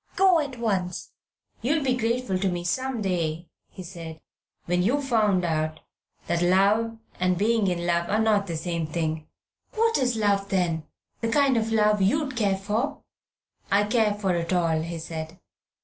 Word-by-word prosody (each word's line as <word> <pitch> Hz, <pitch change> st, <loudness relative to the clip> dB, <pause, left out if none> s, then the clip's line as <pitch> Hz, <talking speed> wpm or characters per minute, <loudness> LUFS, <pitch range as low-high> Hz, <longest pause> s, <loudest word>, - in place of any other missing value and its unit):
Go 375 Hz, -3 st, +5 dB
at 280 Hz, -4 st, -4 dB
once!" 195 Hz, -6 st, -2 dB, 0.5 s
"You'll 290 Hz, +6 st, +1 dB
be 255 Hz, -2 st, +2 dB
grateful 230 Hz, -4 st, -1 dB
to 195 Hz, 0 st, +1 dB
me 175 Hz, -1 st, -3 dB
some 255 Hz, +5 st, -2 dB
day," 170 Hz, -3 st, -2 dB, 0.2 s
he 185 Hz, -, -10 dB
said, 165 Hz, -3 st, -9 dB, 0.5 s
"when 180 Hz, +1 st, +1 dB
you've 265 Hz, +10 st, +1 dB
found 210 Hz, -8 st, +2 dB
out 155 Hz, -1 st, -1 dB, 0.4 s
that 170 Hz, 0 st, 0 dB
love 200 Hz, +6 st, +3 dB, 0.2 s
and 180 Hz, 0 st, +2 dB
being 215 Hz, +1 st, +2 dB
in 175 Hz, -1 st, -1 dB
love 170 Hz, 0 st, 0 dB
are 210 Hz, -, +2 dB
not 215 Hz, -2 st, +2 dB
the 165 Hz, -2 st, -3 dB
same 170 Hz, -1 st, -2 dB
thing." 155 Hz, -1 st, -3 dB, 0.5 s
"What 455 Hz, +1 st, +2 dB
is 250 Hz, -3 st, +1 dB
love, 200 Hz, -2 st, +1 dB
then? 170 Hz, -5 st, 0 dB, 0.3 s
The 230 Hz, -1 st, -1 dB
kind 280 Hz, -1 st, +3 dB
of 225 Hz, -1 st, 0 dB
love 210 Hz, -2 st, +3 dB
you'd 270 Hz, +7 st, +1 dB
care 200 Hz, -4 st, +1 dB
for?" 210 Hz, +7 st, -2 dB, 0.7 s
"I 200 Hz, +1 st, +4 dB
care 210 Hz, -1 st, +2 dB
for 195 Hz, -3 st, 0 dB
it 170 Hz, 0 st, -2 dB
all," 165 Hz, -3 st, +2 dB
he 170 Hz, +1 st, -5 dB
said. 160 Hz, +1 st, -6 dB
195 Hz, 170 wpm, -25 LUFS, 170-230 Hz, 0.7 s, Go